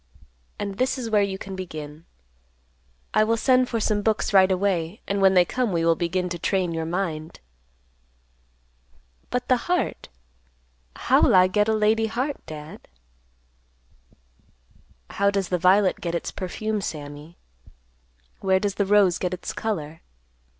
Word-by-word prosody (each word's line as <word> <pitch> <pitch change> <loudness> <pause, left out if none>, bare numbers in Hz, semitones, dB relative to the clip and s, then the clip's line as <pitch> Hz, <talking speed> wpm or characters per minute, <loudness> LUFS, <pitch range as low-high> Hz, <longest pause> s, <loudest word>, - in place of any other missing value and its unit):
And 200 -1 -5
this 255 +2 +1
is 235 -3 -5
where 210 -1 +4
you 195 -1 -1
can 190 0 -8
begin. 155 -4 -8 1.1
I 215 - +4
will 230 +1 +1
send 255 +1 +3
for 230 - -1
some 210 -1 0
books 215 0 0
right 190 -1 +6
away, 185 0 -1
and 200 0 -1
when 190 0 +5
they 180 -1 +6
come 250 +2 -1
we 165 -2 0
will 165 - +5
begin 180 +2 -1
to 175 -1 -5
train 185 -1 0
your 160 0 -3
mind." 165 -3 -4 1.9
"But 250 0 -2
the 255 - +4
heart, 360 -1 -1 0.9
how'll - - +3
I 185 0 +7
get 210 +3 +1
a 220 - +2
lady 220 +1 +2
heart, 255 +6 -3
Dad?" 150 0 -10 2.2
"How 200 0 +2
does 195 -2 -1
the 180 - 0
violet 185 +2 +3
get 170 -1 -3
its 170 - -3
perfume, 210 +3 -3
Sammy? 150 -1 -7 1.0
Where 190 -1 +2
does 200 0 -1
the 200 - +1
rose 200 -3 +4
get 180 0 -2
its 180 - -7
color? 165 -8 -4
190 Hz, 150 wpm, -24 LUFS, 170-215 Hz, 2.2 s, I